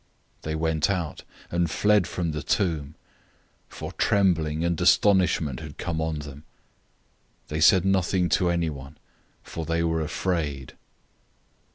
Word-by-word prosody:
'" - - -41
016:008 - - -38
They 80 0 -3
went 80 0 0
out,{TR 85 -6 -1
adds - - -20 0.3
"quickly"} - - -9
and 85 -2 +2
fled 105 +2 +3
from 85 -3 -2
the 75 0 -4
tomb, 80 -7 -1 0.7
for - - -7
trembling 80 -6 +1
and 85 -1 -1
astonishment 85 -9 +3
had 75 -2 -9
come 80 -3 -3
on 80 -1 -2
them. 75 0 -9 1.1
They 75 +1 -2
said 90 +3 +6
nothing 95 -1 +2
to 90 +2 +2
anyone; 75 -4 -3 0.5
for 80 - -6
they 85 +1 -1
were 80 -1 0
afraid. 75 -4 -2
80 Hz, 150 wpm, -25 LUFS, 75-90 Hz, 1.1 s, said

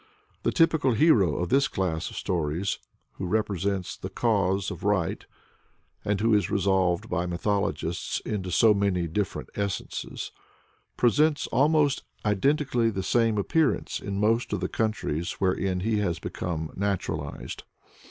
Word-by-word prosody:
The - - +1
typical 160 -6 +3
hero 110 - +4
of 90 0 -2
this 135 +3 +4
class 85 -8 -2
of - - -11
stories, 85 +2 -1 0.4
who 95 - -3
represents 100 -2 -1
the - - -7
cause 100 -4 +1
of - - -7
right, 100 -5 0 0.8
and 105 -1 0
who 115 +1 +3
is 100 -3 +2
resolved 95 -3 +1
by 90 0 -1
mythologists 100 +3 -1
into 95 -3 -3
so 105 +5 +5
many 100 -4 +1
different 95 +4 -3
essences, 100 -2 -4 0.7
presents 150 +5 +3
almost 145 0 +3 0.2
identically 120 +3 +2
the 95 -3 -3
same 115 +2 +2
appearance 155 +10 +1
in 100 0 -4
most 115 +3 +1
of - - 0
the - - -1
countries 105 - -1
wherein 95 -1 0
he 110 +1 +1
has 90 -5 0
become 80 -3 -4
naturalized. 90 -7 -3
100 Hz, 135 wpm, -27 LUFS, 90-115 Hz, 0.8 s, so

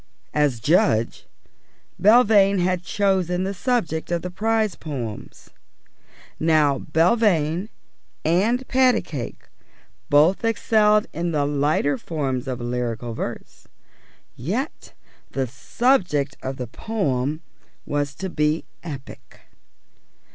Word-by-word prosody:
As 145 -5 +1
judge, 115 -5 +1 0.7
Belvane 205 -2 +5
had 180 0 +1
chosen 185 -1 0
the 195 +1 -2
subject 195 - -1
of 170 -1 -1
the 180 - -4
prize 220 +1 0
poems. 125 -11 -7 0.9
Now 155 -4 +3
Belvane 170 +1 +2 0.6
and 215 +11 +2
Patacake 250 - 0 0.6
both 155 +9 +4
excelled 215 -1 +3
in 170 +1 -2
the 145 -2 +1
lighter 145 -1 +1
forms 135 -6 -3
of 130 -2 -3
lyrical 120 -1 -3
verse; - - -7 0.7
yet 215 - -4 0.4
the 135 -1 0
subject 145 - 0
of 130 0 -4
the 125 - -4
poem 150 - -2 0.4
was 145 -1 -2
to 190 +5 -4
be 150 +1 0 0.2
epic. 140 -6 -10
160 Hz, 100 wpm, -23 LUFS, 140-200 Hz, 0.9 s, Belvane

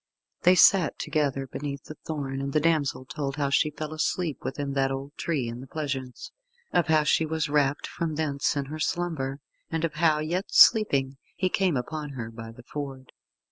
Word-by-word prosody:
Then 180 - +6
they - - +3
sat 180 -2 +5
together 140 -3 -1
beneath 140 +1 -5
the - - -9
thorn, 140 -4 -5
and 140 0 -3
the 155 - +4
damsel 150 -4 +1
told 135 +2 -4
how 140 -2 -1
she 150 - +3
fell 155 +1 -6
asleep 155 0 -1
within 140 +1 -3
that 135 -1 +2
old 135 +2 -5
tree 150 -8 -1
in 120 +1 -6
the 135 - -10
pleasaunce, 135 -4 -5 0.4
of 175 - +3
how 155 -1 +4
she 150 - +3
was 160 -1 -1
rapt 145 -1 +1
from 160 -2 -3
thence 145 -3 0
in 140 -1 -1
her 155 +3 -7
slumber, 155 -6 -2 0.3
and 165 0 0
of 165 - -3
how, 155 -1 +3
yet 170 +6 -1
sleeping, 140 -11 +5 0.2
he 185 - 0
came 185 -6 +1
upon 150 +3 -4
her 115 -2 -5
by 115 0 -9
the 120 +1 -14
Ford. 135 -1 -7
145 Hz, 195 wpm, -27 LUFS, 135-160 Hz, 0.4 s, Then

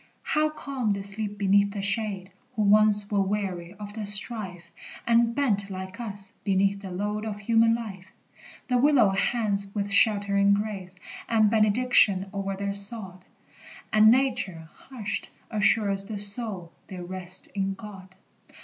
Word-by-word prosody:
How 310 0 +1
calm 275 -6 -4
they 200 -1 -1
sleep 205 +1 -4
beneath 200 0 +3
the 200 -2 -4
shade 195 -2 -2 0.2
Who 215 - +1
once 210 0 +4
were 200 -1 +2
weary 190 -3 -3
of 205 0 -9
the 215 -2 -5
strife, 200 -3 -2 0.4
And 235 0 +3
bent, 205 -8 0
like 190 +1 -7
us, 200 -4 -7
beneath 195 0 +1
the 195 - -7
load 205 +3 -3
Of 215 -2 -4
human 225 +1 +3
life! 195 -5 -7 0.6
The 250 -1 +2
willow 265 -6 +5
hangs 200 0 -1
with 200 -1 -2
sheltering 200 -1 +4
grace 200 -3 -5 0.3
And 220 -2 +3
benediction 215 -3 +3
o'er 195 0 -3
their 200 0 -2
sod, 200 -3 +2 0.7
And 215 0 +7
Nature, 230 -10 0
hushed, 235 -6 -6 0.2
assures 200 -2 +1
the 210 0 -5
soul 200 -4 -1 0.2
They 185 - -8
rest 180 +1 -3
in 195 -1 -2
God. 190 -3 -11
205 Hz, 145 wpm, -26 LUFS, 195-220 Hz, 0.7 s, And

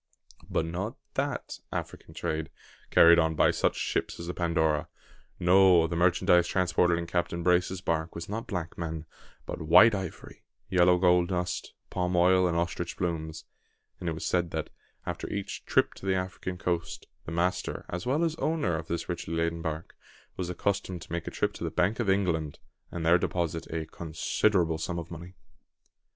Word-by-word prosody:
But 80 - 0
not 95 +9 -4 0.2
that - - -3
African - - -6
trade 80 0 -2 0.4
carried 85 +1 +7
on 80 -1 +2
by - - +4
such - - +1
ships - - -2
as 85 - -5
the 90 - -4
Pandora. 80 -3 +1 0.5
No; 90 -1 +6
the 85 +1 -3
merchandise 90 0 +4
transported 90 -1 +2
in 85 - -3
Captain 85 0 -2
Brace's 90 +1 +2
bark 80 -1 -1
was 85 0 -5
not 110 +3 -4
black 85 -5 -4
men, 80 -1 -4 0.4
but - - -5
white 85 +8 +7
ivory, 95 -4 -6 0.3
yellow 90 -1 +5
gold 90 -1 +4
dust, 90 -1 -3 0.2
palm 90 -1 -1
oil, 90 +1 +5
and 85 -1 0
ostrich 85 0 -2
plumes; 80 -3 -3 0.5
and 85 - -2
it - - -1
was 80 - -5
said, 90 -1 +1
that, 80 -1 -4 0.3
after - - -4
each 100 -1 -5
"trip" - - +3
to 95 - -9
the 95 - +3
African 95 0 -4
coast, 85 -2 -2 0.2
the - - -4
master, 85 +2 -1
as 85 +1 -4
well 145 +6 +2
as 165 -2 +1
owner, 155 - 0
of 80 0 -6
this 85 - -3
richly 85 -2 -4
laden 85 0 -1
bark, 80 0 -5 0.4
was 90 -2 -3
accustomed 90 -1 -2
to - - -15
make 85 0 -3
a - - 0
trip - - -1
to - - -7
the - - -1
Bank 100 +6 +1
of 115 -5 0
England, 85 -6 +1 0.3
and 85 -2 -4
there 85 +2 +5
deposit 85 -2 -2
a 80 0 -3
considerable 85 +2 0
sum 85 +1 -3
of 85 0 -6
money. 85 +3 -9
85 Hz, 180 wpm, -28 LUFS, 85-90 Hz, 0.5 s, carried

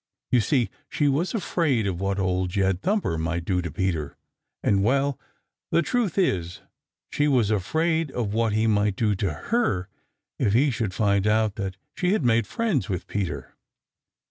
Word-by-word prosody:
You 125 - +5
see, 120 -1 +1 0.2
she 145 - +1
was 155 - 0
afraid 155 - +1
of 95 -2 -2
what 100 0 0
Old 95 -1 0
Jed 95 0 0
Thumper 190 - 0
might 85 +1 -2
do 90 -1 +1
to 85 - -4
Peter, 80 -4 -2 0.5
and 100 -1 +3
well, 135 +4 +1 0.5
the 170 - +3
truth 225 -3 0
is 90 - 0 0.5
she 145 - +1
was 120 -7 +3
afraid 160 - +1
of 115 -6 -3
what 115 0 +1
he 110 +1 +2
might 105 -2 +2
do 105 0 +1
to 95 -1 -1 0.2
her 105 - +1 0.5
if 100 - +2
he 135 +5 +4
should 110 -6 -2
find 100 -1 +2
out 110 -1 +2
that 95 -2 -4 0.2
she 180 +1 +1
had 185 -11 0
made 115 -2 +3
friends 225 - -1
with 90 -3 -3
Peter. 85 -10 -4
105 Hz, 170 wpm, -25 LUFS, 95-140 Hz, 0.5 s, You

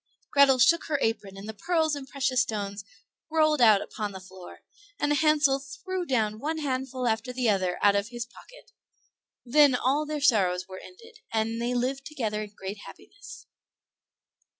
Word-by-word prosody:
Grethel 280 -2 +6
shook 265 +7 +4
her 300 - 0
apron, 210 -5 -2
and 195 +2 -9
the 220 - -5
pearls 320 - 0
and 280 -2 -5
precious 260 -2 0
stones 205 -4 -4 0.5
rolled 310 -3 +2
out 215 -4 +6
upon 210 -2 -5
the 190 - -7
floor, 185 -1 -13 0.4
and 290 0 +1
Hansel 295 -2 +3
threw 345 +7 -6
down 220 -5 0
one 310 +5 -3
handful 260 -3 -2
after 225 +2 -1
the 250 -1 -1
other 185 -3 -1
out 205 -1 +5
of 200 +1 0
his 240 0 -5
pocket. - - -17 0.7
Then 285 +1 +5
all 280 +5 0
their 305 0 -3
sorrows 185 -9 +2
were 185 -1 -9
ended, 455 +4 -15
and 225 +1 -1
they 245 +1 -1
lived 265 +3 -2
together 220 -8 -3
in 210 -1 -9
great 195 +2 -6
happiness. 405 - -13
250 Hz, 170 wpm, -27 LUFS, 210-295 Hz, 0.7 s, Grethel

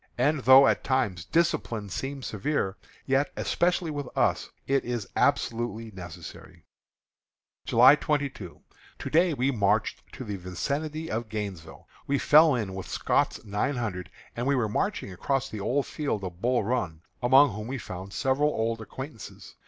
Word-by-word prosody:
And 150 0 +2
though 130 +2 +8
at - - +2
times 110 - 0
discipline 115 - 0
seems 135 +6 -5
severe, 105 -2 -1 0.3
yet, 135 +2 +1
especially 175 -1 0
with 145 -3 -4
us, - - +1 0.2
it 135 0 +1
is 120 -5 -3
absolutely 115 -1 0
necessary. 90 -4 -11 1.0
July 125 +4 +7
22. 140 - -2 0.4
To - - -6
day 170 0 +3
we 130 +2 +1
marched 105 -6 +1
to - - -7
the 105 -4 -5
vicinity 145 - -4
of 110 0 -3
Gainesville. 100 -7 -6 0.2
We 140 - +1
fell 155 +1 +6
in 105 -6 -3
with 95 0 -7
Scott's - - 0
Nine 105 +7 -1
Hundred 105 -7 -4 0.3
as 120 - -3
we 140 +1 +2
were 120 -4 +1
marching 150 - -2
across 135 +8 -1
the 110 - -6
old 130 +7 0
field 140 -10 -3
of 90 -1 -7
Bull 125 -1 +2
Run, 95 -9 -2 0.2
among 130 0 +6
whom 105 +2 -6
we 135 +2 -3
found 95 -4 -8
several 135 +6 +1
old 115 -3 -1
acquaintances. 130 +3 -9
120 Hz, 155 wpm, -27 LUFS, 105-140 Hz, 1.0 s, though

